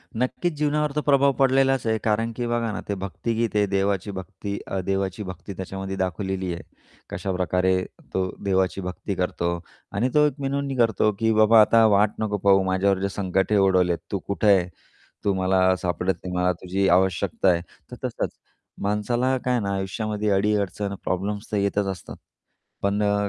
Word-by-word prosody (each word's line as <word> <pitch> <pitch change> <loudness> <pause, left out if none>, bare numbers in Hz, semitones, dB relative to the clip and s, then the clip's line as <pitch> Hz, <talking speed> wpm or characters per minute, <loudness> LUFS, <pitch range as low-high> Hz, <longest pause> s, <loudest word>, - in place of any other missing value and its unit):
नक्कीच 130 +8 -1
जीवनावर 150 0 +1
तर 150 - +1
प्रभाव 140 -1 +4
पडलेलाच 135 -1 +3
आहे. 110 0 +2
कारण 115 +1 +1
की 120 - -2
बघा 120 -1 0
ना, 105 - -4
ते 100 - -1
भक्तीगीत 110 +5 -2
आहे. 105 -1 +4
देवाची 100 0 0
भक्ती 100 +2 -6
अ, 95 - -2
देवाची 95 +1 -2
भक्ती 95 +1 -8
त्याच्यामध्ये 95 +1 -5
दाखवलेली 95 0 -2
आहे. 85 - -6 0.5
कशाप्रकारे 95 0 0 0.3
तो 95 -1 0
देवाची 95 -1 +1
भक्ती 90 +2 -4
करतो 90 -1 -1 0.4
आणि 115 +6 0
तो 150 0 +5
एक 150 - -2
विनवणी 140 0 -2
करतो 110 -2 +3
की 115 0 +2
"बाबा 110 +1 +6
आता 115 +1 +5
वाट 105 0 +4
नको 105 -1 -1
पाहू, 95 -1 +4
माझ्यावर 95 +1 +1
जे 100 +1 -1
संकटे 95 +1 0
उडवलेत, 90 -3 +3
तू 100 - -1
कुठे 100 +2 0
आहे? 90 -2 0 0.6
तू 100 - +2
मला 95 0 +3
सापडत 90 +1 0
नाही, 90 0 -4
मला 90 0 +2
तुझी 95 +2 0
आवश्यकता 95 +1 +2
आहे," 85 -1 +2 0.3
तर - - -6
तसंच. - - -2 0.5
माणसाला 120 +6 0
काय 125 - +2
आहे 120 - +1
ना 100 0 -1
आयुष्यामध्ये 105 +2 -2
अडी-अडचण 100 0 0
प्रॉब्लेम्स 100 +3 -3
तर 105 - 0
येतच 100 0 +1
असतात. 90 - -9 0.7
पण 100 +1 +1
अ, 100 0 +1
100 Hz, 170 wpm, -24 LUFS, 95-110 Hz, 0.7 s, बाबा